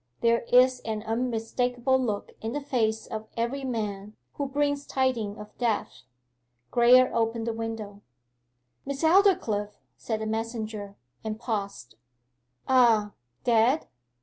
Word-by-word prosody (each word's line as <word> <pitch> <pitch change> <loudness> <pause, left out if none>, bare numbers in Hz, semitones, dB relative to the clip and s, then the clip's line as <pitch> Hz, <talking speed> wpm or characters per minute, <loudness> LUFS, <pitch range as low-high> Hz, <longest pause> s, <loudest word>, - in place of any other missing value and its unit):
There 235 0 +3
is 255 +1 +6
an 220 -2 -4
unmistakable 245 +2 0
look 210 -4 -3
in 225 +1 -3
the 290 - -1
face 225 -6 -1
of 220 0 -6
every 240 +4 -1
man 210 -4 -4 0.2
who 285 - -3
brings 285 +1 -1
tidings 235 -6 0
of 210 0 -11
death. 205 - -2 0.7
Graye 250 +1 +6
opened 225 0 0
the 230 - -1
window. 225 -3 -5 0.8
'Miss 280 +2 -5
Aldclyffe....' 320 - +3 0.2
said 220 -2 -3
the - - -2
messenger, 220 -2 -4 0.3
and 220 0 -4
paused. 200 - -4 0.7
'Ah 230 -5 +4 0.3
dead? 240 +5 +3
230 Hz, 120 wpm, -27 LUFS, 215-255 Hz, 0.8 s, is